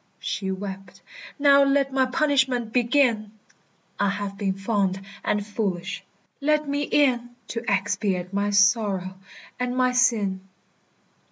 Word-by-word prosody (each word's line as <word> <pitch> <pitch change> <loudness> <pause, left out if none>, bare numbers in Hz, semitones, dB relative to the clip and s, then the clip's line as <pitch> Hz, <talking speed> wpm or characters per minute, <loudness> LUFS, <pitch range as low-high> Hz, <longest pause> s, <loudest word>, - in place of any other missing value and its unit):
She 190 - -3
wept, 190 -1 -7 0.3
"Now 280 -1 +6
let 275 -1 +1
my 260 -1 +2
punishment 260 -6 +1
begin! 235 -4 +2 0.7
I 200 - +2
have 200 0 -4
been 195 -2 -2
fond 195 -1 0 0.2
and 205 -1 0
foolish. 195 -4 -3 0.4
Let 300 +1 +1
me 285 +1 -1
in 245 -5 +1
To 230 0 -4
expiate 195 -2 -1
my 200 +1 0
sorrow 200 -3 +2 0.4
and 250 0 -2
my 255 0 +3
sin." 215 -6 +1
215 Hz, 120 wpm, -24 LUFS, 195-255 Hz, 0.7 s, Now